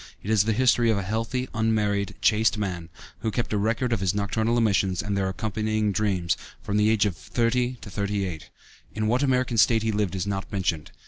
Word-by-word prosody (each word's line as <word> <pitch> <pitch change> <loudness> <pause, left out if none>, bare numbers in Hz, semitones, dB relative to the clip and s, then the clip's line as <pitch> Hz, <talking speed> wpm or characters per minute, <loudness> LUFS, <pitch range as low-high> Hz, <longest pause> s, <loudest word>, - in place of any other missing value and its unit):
It 105 - -3
is 105 -2 +4
the 110 - +1
history 120 0 +3
of 110 - +2
a 100 - -2
healthy, 115 +6 -2
unmarried, 105 -3 0
chaste 110 0 +3
man, 90 -5 -4 0.3
who 110 - -1
kept 115 0 -2
a - - +2
record 115 +3 0
of 115 - 0
his 95 0 0
nocturnal 110 +3 0
emissions 95 -5 +1
(and 100 -1 -2
their 95 -1 0
accompanying 110 +1 -1
dreams) 95 -5 0 0.2
from 105 - -2
the 105 +1 +4
age 110 -1 +3
of 100 -4 -1
thirty 120 +7 0
to - - -9
thirty 100 0 -1
eight. 80 -5 -7 0.5
In 110 0 -1
what 120 +4 +2
American 130 -4 +1
State 110 +3 +4
he 110 - +1
lived 105 -3 -1
is 95 0 -2
not 100 -1 -4
mentioned. 85 -6 -1
105 Hz, 210 wpm, -25 LUFS, 100-115 Hz, 0.5 s, is